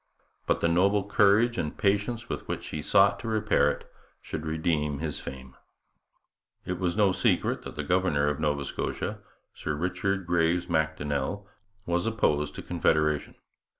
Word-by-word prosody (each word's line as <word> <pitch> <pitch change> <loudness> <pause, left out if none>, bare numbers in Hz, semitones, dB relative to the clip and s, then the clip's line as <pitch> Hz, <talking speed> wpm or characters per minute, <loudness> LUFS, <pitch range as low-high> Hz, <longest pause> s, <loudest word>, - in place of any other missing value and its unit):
But - - +1
the - - +3
noble 100 +4 +2
courage 105 +3 +4
and 75 - -3
patience 105 +4 0
with - - -5
which - - -4
he 75 - -4
sought 100 +6 +4
to 115 - -6
repair 110 -1 +2
it - - -5 0.3
should 80 0 -6
redeem 80 -2 0
his 75 0 -3
fame. 65 -1 -9 1.1
It 90 -1 -3
was 90 0 -1
no 100 -3 +4
secret 90 - +1
that - - -8
the 75 - -3
governor 85 -3 +2
of 75 -1 -1
Nova 75 -2 0
Scotia, - - -3 0.3
Sir 75 - -3
Richard 95 +4 -1
Graves 85 0 +1
Macdonnell, 80 +4 -1 0.4
was 85 +3 0
opposed 75 -10 0
to - - -7
Confederation. 75 -1 +1
85 Hz, 150 wpm, -28 LUFS, 75-100 Hz, 1.1 s, courage